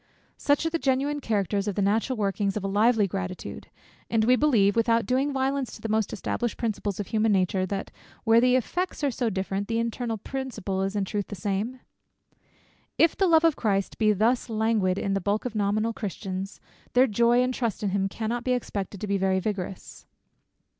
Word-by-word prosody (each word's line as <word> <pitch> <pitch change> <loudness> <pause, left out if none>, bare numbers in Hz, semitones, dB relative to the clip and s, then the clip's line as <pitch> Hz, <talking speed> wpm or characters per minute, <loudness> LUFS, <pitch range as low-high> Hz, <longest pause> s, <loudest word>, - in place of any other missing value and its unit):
Such 285 +2 +1
are 325 - 0
the 330 - 0
genuine 280 +2 0
characters, 205 -5 0
such 205 -3 -2
the 205 - 0
natural 225 +6 +1
workings 200 -1 0
of 205 - -4
a - - -1
lively 215 +2 +3
gratitude. 185 -1 -5 0.4
And 220 -1 +2
we 250 +2 +5
believe, 230 -9 +3
without 230 0 +2
doing 265 +3 +1
violence 270 -2 -1
to - - -13
the 225 - -4
most 220 -1 +1
established 240 +3 -2
principles 210 -4 -2
of 205 - -2
human 220 0 +2
nature, 185 -1 +1
that 195 +1 -4 0.3
where 230 0 +5
the 250 0 +4
effects 350 +7 -2
are 280 - +2
so 240 -1 -1
different, 195 0 -2
the 230 - -1
internal 230 0 -2
principle 215 -6 -4
is 195 +1 -2
in 200 -1 0
truth 205 0 -3
the 205 - -6
same? 205 +7 -3 1.2
If 330 - +4
the 385 - +2
love 325 -1 +5
of 330 -3 +4
Christ 195 -3 -1
be 215 -1 +4
thus 225 +5 +1
languid 220 -4 +1
in 195 - -1
the 195 - 0
bulk 205 +5 -1
of 250 - -3
nominal 215 +2 0
Christians, 195 -2 -5 0.3
their 250 +1 +6
joy 235 +2 +3
and 255 0 0
trust 230 -5 -2
in 205 - +1
him 195 0 0
cannot 230 +3 -3
be 255 - +1
expected 200 -5 -4
to - - -2
be 200 -1 0
very 190 0 +2
vigorous. 190 -2 -5
220 Hz, 200 wpm, -26 LUFS, 195-250 Hz, 1.2 s, their